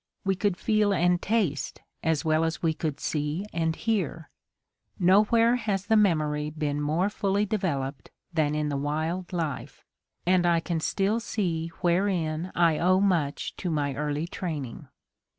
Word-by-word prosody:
We 195 - +3
could 190 -1 0
feel 215 -2 +2
and 175 0 +2
taste 195 -10 -1 0.2
as 160 -1 +1
well 155 0 +3
as 165 +1 -2
we 160 -1 +2
could 155 -2 -3
see 150 +5 -2
and 160 -1 0
hear. 185 -8 -2 0.7
Nowhere 215 +6 +4
has 205 -5 -2
the 220 - +3
memory 155 -7 +2
been 150 -1 -2
more 155 +6 +1
fully 205 0 0
developed 145 - -2 0.2
than 150 -2 +1
in 150 -1 0
the 140 - -1
wild 155 +5 -2
life, 165 -6 -4 0.4
and 180 0 +4
I 170 -1 +4
can 165 0 -2
still 200 +7 0
see 175 -8 -2
wherein 175 -2 0
I 165 -3 +3
owe 185 +2 +4
much 170 -8 0
to 180 - -3
my 145 -3 0
early 150 +2 -2
training. 155 -9 -5
170 Hz, 150 wpm, -27 LUFS, 150-195 Hz, 0.7 s, Nowhere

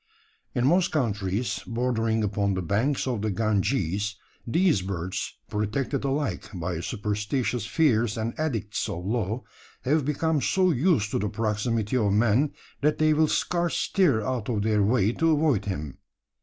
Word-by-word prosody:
In 120 - +1
most 175 +6 +4
countries 105 -5 -1
bordering 115 -2 0
upon 100 -1 0
the 95 - -2
banks 115 - 0
of 125 -5 -1
the 110 - 0
Ganges, 105 -1 0 0.3
these 165 - +3
birds, 95 0 -4
protected 120 +7 -2
alike 135 -9 -2
by 85 -1 -3
superstitious 105 +4 -2
fears 115 -3 +2
and 115 +1 -2
edicts 115 -10 -2
of 85 +2 -5
law, 110 +2 -1 0.4
have 145 +4 +2
become 150 +2 0
so 185 +3 +3
used 135 - +2
to - - 0
the 105 +1 -1
proximity 110 +2 -1
of 105 -4 +2
man, 120 +7 +3 0.3
that 150 +2 +2
they 155 0 +4
will 155 +1 +3
scarce 175 +2 0
stir 150 - +2
out 125 -3 -2
of 105 -4 0
their 105 -1 +2
way 105 0 +3
to 165 +6 +1
avoid 145 -9 +2
him. 75 -9 -5
115 Hz, 155 wpm, -26 LUFS, 105-140 Hz, 0.4 s, most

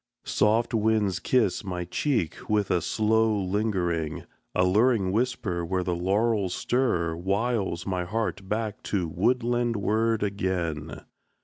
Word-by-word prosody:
Soft 115 +3 +2
winds 105 -4 +1
kiss 110 -2 +1
My 90 -3 -4
cheek 100 - -2
with 105 -2 +1
a 90 - +2
slow 110 +4 +2
lingering. 90 -5 -1 0.3
A 90 - +3
luring 105 0 +3
whisper 105 -6 -1
where 90 +2 -1
the 90 - -1
laurels 100 +1 +1
stir 85 -10 0
Wiles 95 0 -1
my 90 -2 -2
heart 100 -1 -3
back 110 -1 -2
to 95 -5 -1
woodland 120 +6 +1
ward 110 +2 +1
again. 85 -7 -2
100 Hz, 125 wpm, -26 LUFS, 90-110 Hz, 0.3 s, A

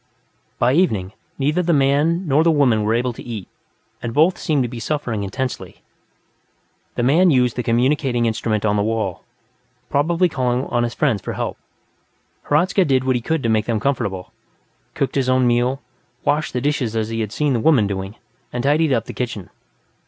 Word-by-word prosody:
By 125 +2 +2
evening, 110 - +1 0.2
neither 150 +6 +1
the 175 -1 +1
man 150 +6 +2
nor 150 +2 +3
the 170 - +3
woman 135 -8 +3
were 110 +2 +1
able 125 +1 0
to - - -10
eat, 110 -6 -7 0.5
and 115 - -5
both 165 +5 +3
seemed 145 -4 +1
to - - -1
be 120 0 -7
suffering 120 -5 -2
intensely. 125 +7 -5 1.1
The 120 - -1
man 165 +9 +4
used 125 -5 +2
the 125 - -1
communicating 120 +1 +1
instrument 110 -1 -1
on 105 0 +2
the - - +2
wall, 110 -4 -2 0.7
probably 170 +5 +2
calling 130 -4 -1
on 120 - -1
his 120 0 -2
friends 105 -4 +1
for - - -5
help. - - -3 0.9
Hradzka 180 +6 +2
did 130 -5 +2
what 130 -1 +1
he 120 - -1
could 160 +4 -1
to 115 - +1
make 110 -1 +2
them 115 -2 0
comfortable, 105 -7 -2 0.6
cooked 140 - -1
his 135 -2 0
own 130 0 +3
meal, 125 +3 +1 0.4
washed 150 +2 0
the 125 - -1
dishes 135 -6 -1
as 110 -1 -1
he 115 0 -3
had 110 -2 -2
seen 145 +2 0
the 120 - +1
woman 130 -4 +4
doing, 95 +1 -4 0.4
and 120 0 -3
tidied 150 +2 +2
up 115 -4 +1
the - - -8
kitchen. 120 -6 -5
125 Hz, 190 wpm, -20 LUFS, 115-145 Hz, 1.1 s, man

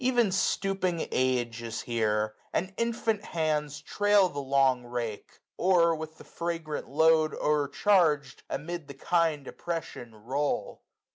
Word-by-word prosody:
Even 245 -5 +3
stooping 190 -2 0
age 120 -2 0
is 115 -1 -4
here; 110 -2 0 0.2
and 185 +2 -2
infant 230 -2 -1
hands 150 -5 -1
Trail 205 -2 +3
the 145 - -5
long 135 -2 +2
rake, 120 -3 -5 0.2
or, 175 -2 +4
with 160 0 -7
the - - -12
fragrant 165 -5 -4
load 160 +2 +3
O'ercharg'd, 150 -2 +2
amid 170 0 -5
the 140 - -9
kind 160 -1 0
oppression 160 -9 -6
roll. 130 +7 -2
155 Hz, 125 wpm, -28 LUFS, 130-175 Hz, 0.2 s, or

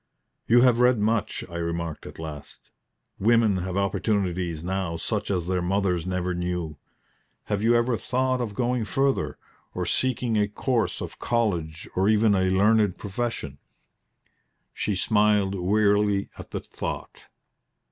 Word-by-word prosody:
"You 120 +1 +6
have 125 -2 +5
read 125 0 +5
much," 110 +1 0
I 85 -1 -7
remarked 85 -1 -3
at - - -11
last. 75 -3 -9 0.5
"Women 110 -1 +4
have 95 +1 -3
opportunities 95 -5 -1
now 90 -2 -2
such 105 +3 -2
as 90 -4 0
their 90 0 0
mothers 90 -1 0
never 90 0 -1
knew. 90 -3 -3 0.7
Have 105 -1 -2
you 115 +2 +4
ever 120 +1 +2
thought 130 +1 0
of 110 -4 -4
going 125 0 0
further 135 +7 0 0.4
or - - -2
seeking 125 -3 0
a 105 - +2
course 115 +3 -1
of - - -7
college 85 -9 -1
or 95 +3 +3
even 110 0 +4
a 95 -1 +2
learned 105 +1 +3
profession?" 100 - -4 1.1
She 105 - -1
smiled 105 0 +2
wearily 100 +1 +2
at - - -10
the - - -4
thought. - - -6
100 Hz, 140 wpm, -25 LUFS, 90-115 Hz, 1.1 s, You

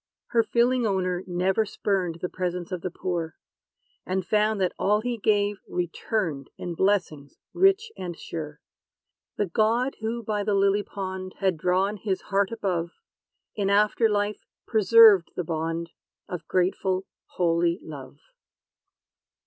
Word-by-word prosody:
Her 230 - +4
feeling 240 +1 +2
owner 185 -2 -1
never 185 +4 +1
spurned 190 -5 -2
The - - +1
presence 180 0 -4
of 180 -2 -3
the 185 - -3
poor; 170 -3 -3 0.7
And 185 -1 -2
found 215 0 +2
that 185 -2 +1
all 210 +2 +2
he 245 +1 -2
gave 205 -1 +1
returned 175 - -2
In 175 - -5
blessings 165 -7 0 0.2
rich 390 +5 +3
and 175 -2 -6
sure. 150 -2 -7 0.8
The 205 - +1
God 225 +8 +1
who 230 +2 -3
by 210 -1 -1
the 205 0 +1
lily 200 +1 +3
pond 190 -2 -6
Had 190 -3 +1
drawn 185 +6 +1
his 195 -2 -2
heart 200 +1 +2
above, 185 -7 -2 0.7
In 200 -2 0
after 210 +3 +3
life 205 0 -1 0.2
preserved 220 -4 +6
the 180 - -2
bond 165 +1 -3 0.4
Of 180 - -6
grateful, 185 +1 0 0.3
holy 170 -1 +2
love. 140 -4 -9
190 Hz, 135 wpm, -26 LUFS, 175-210 Hz, 0.8 s, preserved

